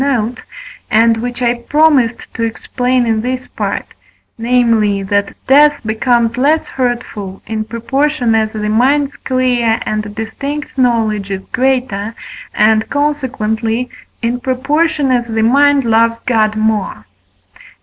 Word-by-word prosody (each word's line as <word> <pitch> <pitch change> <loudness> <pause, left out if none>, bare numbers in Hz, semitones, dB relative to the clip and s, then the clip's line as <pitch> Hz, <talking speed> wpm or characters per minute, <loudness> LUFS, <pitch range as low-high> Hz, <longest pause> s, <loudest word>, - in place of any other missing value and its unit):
note, 245 -3 -1 0.5
and 225 +1 +4
which 245 +2 -4
I 240 0 +3
promised 275 -3 +2
to - - -5
explain 245 +2 -1
in 225 -1 0
this 255 +2 -3
Part; - - -3 0.5
namely, 230 -4 +1
that 200 +1 -1
death 290 +2 +5
becomes 235 +1 +1
less 300 +5 +2
hurtful, 235 -6 -4
in 220 -1 -3
proportion 245 +3 0
as 220 -1 +1
the 210 -1 -3
mind's 270 +6 +2
clear 245 -3 0
and 215 -1 -3
distinct 275 +7 -5
knowledge 225 -6 +1
is 190 -1 -4
greater, 250 -5 -1 0.4
and, 220 0 +2
consequently, 250 -5 -1 0.3
in 240 +1 0
proportion 280 +3 0
as 240 -2 +1
the 225 -1 -1
mind 280 +3 +4
loves 230 0 +3
God 215 -3 +2
more. 215 - -1
235 Hz, 125 wpm, -15 LUFS, 220-260 Hz, 0.5 s, death